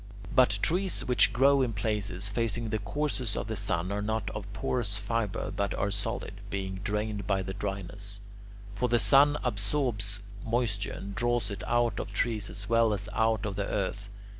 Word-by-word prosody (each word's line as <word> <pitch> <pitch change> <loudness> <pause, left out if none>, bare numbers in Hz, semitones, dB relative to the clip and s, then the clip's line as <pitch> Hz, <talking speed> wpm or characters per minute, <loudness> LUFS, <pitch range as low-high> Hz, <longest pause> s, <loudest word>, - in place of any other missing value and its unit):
But 125 -6 +5
trees 185 +3 +1
which 125 -2 +5
grow 135 +4 +5
in 120 -3 +1
places 100 -3 -1
facing 115 +1 -1
the 110 0 0
course 135 -7 -2
of - - -2
the 110 +1 -3
sun 95 -2 0
are 100 +1 -1
not 110 0 -1
of 105 -1 -6
porous 105 0 0
fibre 110 -1 -1
but 100 -2 0
are 100 +1 0
solid, 105 -1 -3
being 95 -1 -3
drained 105 -1 -2
by 95 -2 +1
the 95 - -4
dryness; 100 0 -5 0.5
for 125 +5 0
the 120 - +4
sun 145 +4 +5
absorbs 105 -2 0 0.2
moisture 115 -4 0
and 100 0 -6
draws 120 -1 0
it 100 - -5
out 120 -3 +2
of - - -4
trees 110 -1 0
as 100 0 -4
well 115 -1 +4
as 100 +1 -5
out 110 -1 +2
of 100 -2 -2
the 100 0 -1
earth. 100 0 -2
105 Hz, 180 wpm, -29 LUFS, 100-120 Hz, 0.5 s, But